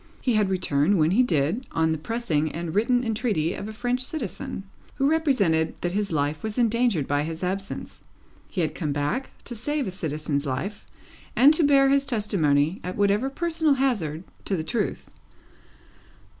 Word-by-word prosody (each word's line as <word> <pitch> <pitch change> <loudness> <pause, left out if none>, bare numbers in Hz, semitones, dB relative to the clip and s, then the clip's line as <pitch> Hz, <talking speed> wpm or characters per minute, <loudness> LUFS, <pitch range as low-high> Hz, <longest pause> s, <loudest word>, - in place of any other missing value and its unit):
He 250 - +2
had 210 -3 +2
returned 185 0 +2
when 155 0 +3
he 220 +7 +4
did, 175 - 0
on 160 0 +2
the 160 - -1
pressing 160 -6 -1
and 165 0 -4
written 245 +5 +2
entreaty 215 -8 0
of 205 - -6
a - - -5
French 245 +3 -1
citizen, 265 - -5 0.3
who 275 - +2
represented 250 - +2
that 175 - -1
his 200 0 -1
life 150 0 -1
was 220 0 -4
endangered 235 - +2
by 145 0 +1
his 160 +3 -4
absence. 195 +2 -4 0.5
He 185 - -2
had 155 -2 -1
come 150 -5 -2
back, 145 - -1
to - - -6
save 285 +6 -2
a 190 - -3
citizen's 150 -4 -3
life, 160 +11 -4 0.5
and 280 +5 +7
to 315 - +2
bear 275 -2 +5
his 275 0 +2
testimony, 175 - +1
at 180 +1 -4
whatever 205 +5 +2
personal 320 0 +2
hazard, 195 - 0 0.2
to 195 - 0
the 160 - -2
truth. 215 +6 -2
200 Hz, 170 wpm, -25 LUFS, 160-250 Hz, 0.5 s, and